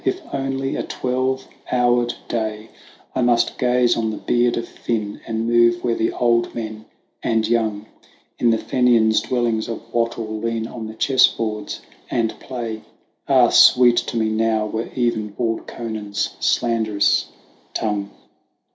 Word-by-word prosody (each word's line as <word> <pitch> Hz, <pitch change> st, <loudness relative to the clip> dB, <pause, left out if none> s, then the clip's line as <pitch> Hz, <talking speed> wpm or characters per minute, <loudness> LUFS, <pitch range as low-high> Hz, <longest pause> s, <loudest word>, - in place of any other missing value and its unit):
if 380 Hz, -, 0 dB
only 135 Hz, 0 st, -2 dB
a -, -, -1 dB
twelve 130 Hz, +1 st, -2 dB, 0.2 s
houred 120 Hz, -1 st, +2 dB, 0.2 s
day, 110 Hz, -1 st, -3 dB, 0.5 s
I -, -, 0 dB
must 120 Hz, -1 st, +2 dB
gaze 125 Hz, -1 st, +3 dB
on 110 Hz, -1 st, -1 dB
the 110 Hz, -, -4 dB
beard 120 Hz, 0 st, +1 dB
of 115 Hz, -, -3 dB
Finn, 110 Hz, -3 st, -4 dB
and 115 Hz, 0 st, -2 dB
move 120 Hz, 0 st, +3 dB
where 120 Hz, -, +1 dB
the 115 Hz, 0 st, 0 dB
old 120 Hz, -1 st, +1 dB
men 110 Hz, -1 st, -6 dB, 0.4 s
and 110 Hz, -1 st, +1 dB
young 110 Hz, -3 st, 0 dB, 0.5 s
In 120 Hz, -, +3 dB
the 115 Hz, -, +3 dB
Fenians' 115 Hz, -3 st, +3 dB
dwellings 120 Hz, -3 st, -1 dB
of 115 Hz, -, -7 dB
wattle 115 Hz, -2 st, -1 dB
lean 115 Hz, 0 st, -2 dB
on 115 Hz, -1 st, -7 dB
the 110 Hz, -, -9 dB
chessboards 110 Hz, -4 st, +1 dB, 0.3 s
and 115 Hz, -2 st, 0 dB
play, 115 Hz, -4 st, -5 dB, 0.5 s
Ah, -, -, +5 dB
sweet 120 Hz, -1 st, +6 dB
to 120 Hz, -, -1 dB
me 110 Hz, -1 st, +1 dB
now 110 Hz, 0 st, +1 dB
were 110 Hz, +2 st, -4 dB
even 120 Hz, -4 st, 0 dB
bald 115 Hz, +2 st, -3 dB
Conan's 110 Hz, -3 st, -4 dB
slanderous 110 Hz, -4 st, +1 dB, 0.5 s
tongue 105 Hz, -2 st, -1 dB
115 Hz, 145 wpm, -21 LUFS, 110-120 Hz, 0.5 s, sweet